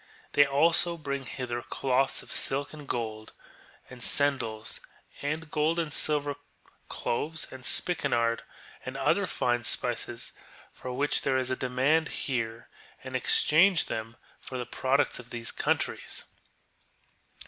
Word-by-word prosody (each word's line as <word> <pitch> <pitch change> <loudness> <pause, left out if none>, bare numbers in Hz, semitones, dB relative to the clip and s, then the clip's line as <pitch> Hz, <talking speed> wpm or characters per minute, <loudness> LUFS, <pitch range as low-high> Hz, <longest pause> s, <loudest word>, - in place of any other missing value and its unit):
They 145 - +6
also 165 +4 +3
bring 140 -4 -4
hither 120 +2 -4
cloths 130 +1 0
of - - -12
silk 140 +2 0
and 150 -2 -10
gold, 110 -3 -3 0.5
and 125 -1 -12
sendals; 115 -6 +2 0.4
also 155 +3 -2
gold 155 +1 +1
and 160 -3 -1
silver, 145 -1 +1 0.5
cloves 155 +6 -2
and 130 -1 -10
spikenard, 115 -9 +2 0.4
and - - -5
other - - +2
fine 120 -1 0
spices 120 0 -1 0.4
for 125 - -7
which 140 +3 +1
there 135 -1 +1
is 130 0 0
a - - +2
demand 130 +6 +2
here, 115 -3 -2 0.4
and 130 0 -6
exchange 165 +7 +5
them 110 +1 -4 0.2
for 130 - -7
the 125 - -3
products 130 +4 +1
of 125 0 -10
these 115 -1 -3
countries. - - -1
130 Hz, 130 wpm, -29 LUFS, 120-145 Hz, 0.5 s, They